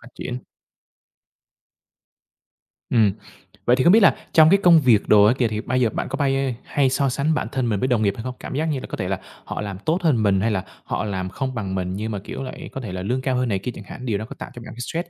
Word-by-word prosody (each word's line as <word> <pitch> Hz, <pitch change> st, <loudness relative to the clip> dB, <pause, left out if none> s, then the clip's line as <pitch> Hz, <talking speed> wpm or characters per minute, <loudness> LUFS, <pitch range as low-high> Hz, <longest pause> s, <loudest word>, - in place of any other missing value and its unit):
phát 120 Hz, -, -14 dB
triển. 125 Hz, -, -5 dB, 2.5 s
Ừm. 110 Hz, -4 st, +4 dB, 0.5 s
Vậy 120 Hz, -, +5 dB
thì 130 Hz, -, +1 dB
không 175 Hz, -, +6 dB
biết 225 Hz, -, +8 dB
là -, -, +6 dB, 0.2 s
trong 160 Hz, -2 st, +7 dB
cái 195 Hz, -, +6 dB
công 170 Hz, -2 st, +7 dB
việc 120 Hz, -7 st, +3 dB
đồ 105 Hz, -1 st, +6 dB
á 110 Hz, -, +5 dB
kìa, 120 Hz, -, +2 dB
thì 110 Hz, -1 st, -3 dB
bây 130 Hz, +1 st, -1 dB
giờ 115 Hz, -, +3 dB
bạn -, -, -3 dB
có -, -, -2 dB
bay 135 Hz, -2 st, 0 dB
hay 140 Hz, -2 st, +1 dB
so 135 Hz, +1 st, +1 dB
sánh 140 Hz, +5 st, 0 dB
bản -, -, -1 dB
thân 130 Hz, -4 st, -1 dB
mình 105 Hz, -3 st, 0 dB
với 130 Hz, -, 0 dB
đồng 125 Hz, -4 st, +2 dB
nghiệp 100 Hz, -2 st, +2 dB
hay 115 Hz, -, -6 dB
không? 130 Hz, 0 st, -5 dB
Cảm -, -, -6 dB
giác 155 Hz, +3 st, 0 dB
như 150 Hz, -4 st, -1 dB
là -, -, -8 dB
có -, -, -6 dB
thể 95 Hz, -, -2 dB
là 95 Hz, -1 st, -1 dB, 0.3 s
họ -, -, -5 dB
làm 100 Hz, -3 st, -5 dB
tốt 160 Hz, -, 0 dB
hơn 130 Hz, -9 st, +3 dB
mình, 100 Hz, -2 st, +3 dB
hay 115 Hz, +2 st, +1 dB
là 95 Hz, -3 st, -1 dB, 0.2 s
họ -, -, -3 dB
làm 95 Hz, -3 st, -3 dB
không 130 Hz, +5 st, -4 dB
bằng 100 Hz, -4 st, -3 dB
mình, 90 Hz, -1 st, -2 dB
nhưng 110 Hz, +2 st, -3 dB
mà, 105 Hz, -, -3 dB
kiểu -, -, -6 dB
là, 130 Hz, -, -5 dB, 0.2 s
có 135 Hz, -, -6 dB
thể 110 Hz, -6 st, -6 dB
là 90 Hz, 0 st, -4 dB
lương 125 Hz, +7 st, -1 dB
cao 130 Hz, -1 st, 0 dB
hơn 125 Hz, -1 st, 0 dB
này 100 Hz, -3 st, 0 dB
kia 125 Hz, -, -4 dB
chẳng -, -, -9 dB
hạn, 125 Hz, +6 st, -9 dB
điều 110 Hz, -5 st, 0 dB
đó 110 Hz, -, -5 dB
có -, -, -8 dB
tạo -, -, -6 dB
cho 120 Hz, -, -10 dB
bạn -, -, -9 dB
thấy 115 Hz, -, -13 dB
stress 165 Hz, +8 st, -4 dB
120 Hz, 290 wpm, -22 LUFS, 105-135 Hz, 2.5 s, biết